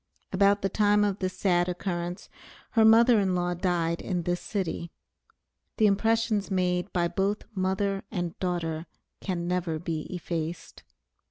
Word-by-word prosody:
About 200 +1 +3
the - - +3
time 210 +1 +3
of 200 -1 0
this 185 -1 -3
sad 175 -2 +2
occurrence, 175 -1 -4 0.4
her 225 - +4
mother 225 +1 +6
in 190 -2 +1
law 175 0 0
died 170 -2 0
in 180 -3 -2
this 175 +1 -1
city. 175 -4 -3 0.9
The 215 - +4
impressions 220 0 +2
made 180 0 0
by 175 -1 +1
both 195 +4 -1
mother 195 +1 -1
and 175 -2 -3
daughter 170 -3 -2 0.3
can 175 -3 -3
never 175 -3 -1
be 160 -1 -4
effaced. 170 -2 -5
185 Hz, 145 wpm, -27 LUFS, 175-200 Hz, 0.9 s, mother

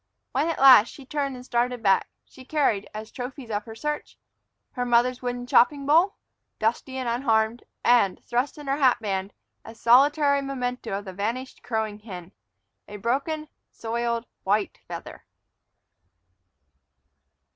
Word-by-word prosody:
When, 280 +5 +1
at 330 - -1
last, 260 -5 +8
she 275 - -12
turned 280 -1 -2
and 250 0 -10
started 245 -1 -1
back, 195 -2 +3 0.2
she 260 - -15
carried, 260 -8 0
as 215 +1 -8
trophies 250 -1 -7
of 205 0 -2
her 225 -1 -9
search, 300 +5 -4 0.5
her 250 - -3
mother's 245 +1 +2
wooden 245 0 -3
chopping 275 +3 +3
bowl, 330 +7 +4 0.4
dusty 240 +4 -1
and 255 -2 -3
unharmed, 230 -1 +1 0.2
and, 235 -6 +4
thrust 245 +6 -1
in 295 - -9
her 275 +1 0
hat 265 -4 +4
band, 195 -2 -3 0.3
a 225 - -11
solitary 280 +4 +4
memento 250 -6 -3
of 205 - -8
the 190 - -7
vanished 230 +7 -4
crowing 220 -3 -3
hen, 185 -5 -9 0.6
a 205 - -8
broken, 280 +8 -2 0.2
soiled 235 0 -2 0.2
white 205 +1 0
feather. - - -8
245 Hz, 145 wpm, -25 LUFS, 220-275 Hz, 0.6 s, last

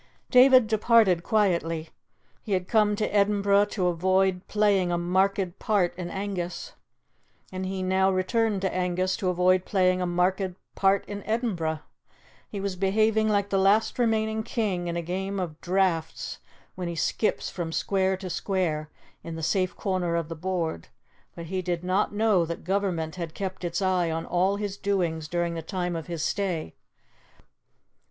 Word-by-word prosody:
David 255 -1 +7
departed 215 -4 +4
quietly. 170 -6 0 0.5
He 205 - -3
had 185 -1 0
come 210 -2 +3
to 210 0 -2
Edinburgh 200 0 +3
to 205 -3 -2
avoid 185 +1 +2
playing 200 -4 +2
a 175 - +1
marked 185 +1 0
part 200 -6 +1
in 175 -1 -5
Angus, 195 - -4 0.8
and 185 0 -4
he 190 0 -3
now 190 +1 +2
returned 200 +2 0
to 190 - 0
Angus 185 +1 0
to 185 - -1
avoid 180 +1 +3
playing 185 -2 +2
a 180 - 0
marked 180 +1 0 0.2
part 195 0 +2
in 205 0 -6
Edinburgh. 185 -9 -2 0.7
He 205 - -5
was 195 -1 -3
behaving 215 +3 +2
like 200 -1 +1
the 195 - +1
last 205 +5 +3
remaining 220 -2 +1
king 210 -6 -2
in 170 0 -2
a 170 - -2
game 190 +3 -3
of 165 -4 -5
draughts 180 -3 -1 0.3
when 180 -1 -5
he 170 - -4
skips 215 +6 -1
from 170 -3 -4
square 190 +2 0
to 190 -1 -7
square 165 -7 -1 0.3
in 165 -1 -6
the 160 - -6
safe 185 +2 0
corner 180 -3 -1
of 165 -2 -2
the 165 - -5
board; 165 - -3 0.5
but 170 - -7
he 185 +3 -2
did 175 -1 -3
not 185 +3 +1
know 205 -3 +2
that 170 0 -5
Government 180 -3 -1
had 170 -3 -5
kept 190 -1 -5
its 175 +3 -2
eye 185 -2 +1
on 165 0 -3
all 185 +3 +1
his 200 -1 -4
doings 175 -6 -1
during 175 0 -1
the 165 - -4
time 180 +1 -3
of 165 -2 -5
his 170 -3 -4
stay. 175 - -2
185 Hz, 165 wpm, -26 LUFS, 175-200 Hz, 0.8 s, David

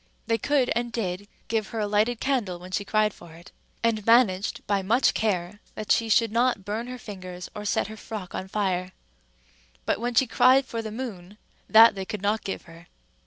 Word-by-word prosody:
They 230 0 0
could 275 0 +1
and 240 0 -1
did 200 -3 -3 0.2
give 220 -2 -1
her 225 - -5
a 210 - 0
lighted 215 +3 +1
candle 235 -10 -1
when 180 +1 -11
she 200 - -1
cried 215 0 +1
for 170 -2 -14
it, 170 +2 -15 0.3
and 225 -2 +1
managed 210 -4 +3
by 200 -1 +1
much 230 +7 +3
care 205 -2 -1 0.2
that 215 - -4
she 225 -1 +3
should 225 +1 +3
not 235 -4 +1
burn 220 +4 -3
her 250 0 -6
fingers 185 -5 -9
or 210 - -6
set - - +1
her 220 +1 -9
frock 210 -4 -7
on 190 - -4
fire; 185 -2 -1 0.9
but - - 0
when 240 +1 -2
she 265 - +5
cried 260 +3 +4
for 230 -3 -4
the 220 - -6
moon, 210 -5 -7 0.3
that 225 +1 +8
they 195 -1 -5
could 205 0 -6
not 210 +2 0
give 195 - -5
her. 165 0 -15
215 Hz, 205 wpm, -26 LUFS, 190-230 Hz, 0.9 s, that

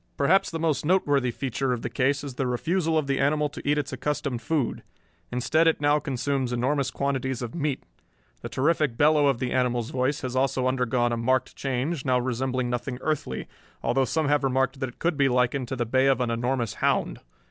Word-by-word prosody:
Perhaps 170 +8 +3
the 165 - -4
most 160 -5 0
noteworthy 145 -7 +2
feature 130 +1 -2
of 120 - -4
the - - -2
case 135 +4 +1
is 140 -3 -6
the 130 +1 -2
refusal 160 +6 0
of 155 - +1
the 135 -1 0
animal 150 +2 +2
to - - -9
eat 150 - +3
its 145 0 -2
accustomed 140 -4 -2
food. 140 0 -1 0.5
Instead 125 +7 +2
it 165 - +3
now 145 +1 +3
consumes 135 -2 -2
enormous 130 +3 0
quantities 130 -2 -2
of 120 - -5
meat. 150 -4 -2 0.6
The - - -6
terrific 145 -3 +1
bellow 150 -1 +4
of 135 -3 +2
the 125 0 -3
animal's 125 -2 0
voice 130 +4 0
has 130 -3 -4
also 130 -1 +1
undergone 125 -1 +1
a 120 - -1
marked 130 +3 0
change, 135 +3 -2
now 130 -2 +2
resembling 130 0 -1
nothing 125 +1 -3
earthly, 155 0 -2 0.4
although 130 +3 +2
some 155 +4 0
have 145 0 +2
remarked 135 +1 +1
that 130 - -2
it 120 - -16
could 170 -3 0
be 140 -1 +3
likened 125 +1 +1
to 130 - -3
the 120 -1 -1
bay 130 +3 +2
of 135 -1 +3
an 125 -2 0
enormous 120 -1 -1
hound. - - +1
135 Hz, 205 wpm, -26 LUFS, 125-145 Hz, 0.6 s, bellow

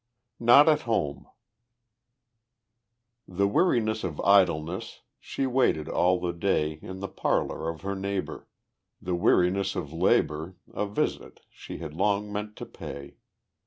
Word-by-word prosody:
Not 120 +6 +7
at 155 -2 +4
Home 75 -10 -1 2.0
The 100 +2 0
Weariness 110 - +1
of 85 -5 -4
Idleness, 90 -3 +2 0.2
She 135 - -3
waited 125 -12 +1
all 90 +1 +2
the 90 -1 -2
day 80 -4 0
In 95 0 -8
the 95 - -3
parlor 80 - -1
of 80 -1 -6
her 100 +2 -3
neighbor, 95 0 -4 0.5
The 90 - -4
Weariness 95 +1 +2
of 75 +1 -5
Labor 80 0 +1 0.2
A 105 - -2
visit 100 - -3
she - - -9
had 80 -3 -7
long 105 +4 0
meant 105 +1 -4
to - - -7
pay. 70 0 -9
95 Hz, 130 wpm, -27 LUFS, 85-105 Hz, 2.0 s, Not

